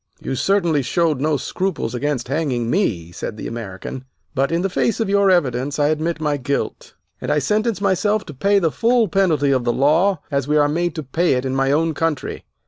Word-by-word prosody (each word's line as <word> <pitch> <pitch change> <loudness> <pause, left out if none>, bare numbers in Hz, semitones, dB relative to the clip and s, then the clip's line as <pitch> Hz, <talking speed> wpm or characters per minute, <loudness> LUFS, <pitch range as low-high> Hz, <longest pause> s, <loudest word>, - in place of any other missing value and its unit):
"You - - -4
certainly 170 0 +2
showed 150 +2 0
no 150 0 +1
scruples 185 -6 -3
against 130 -1 -2
hanging 130 -5 -1
me," 90 - 0
said 105 +5 -6
the - - -7
American, 115 +3 -6 0.3
"but 135 +1 0
in 170 +2 0
the - - +2
face 225 +5 0
of 220 -3 0
your 200 0 +4
evidence 140 -6 +1
I 145 0 +2
admit 155 +2 -1
my 150 -2 0
guilt, 140 +1 -3 0.3
and - - -2
I - - +2
sentence 210 - 0
myself 205 +2 +1
to 150 - -9
pay 200 +9 +2
the 165 -5 +2
full 235 +3 +2
penalty 165 -7 +2
of 130 -2 +1
the 120 - +1
law 155 +8 +2
as 140 -1 0
we 150 +1 +2
are 145 -1 +4
made 170 +3 -1
to 155 - -4
pay 165 +6 +1
it 125 0 -1
in 130 0 -1
my 135 0 +2
own 160 +2 +2
country. 160 -1 -2
150 Hz, 215 wpm, -20 LUFS, 135-185 Hz, 0.3 s, your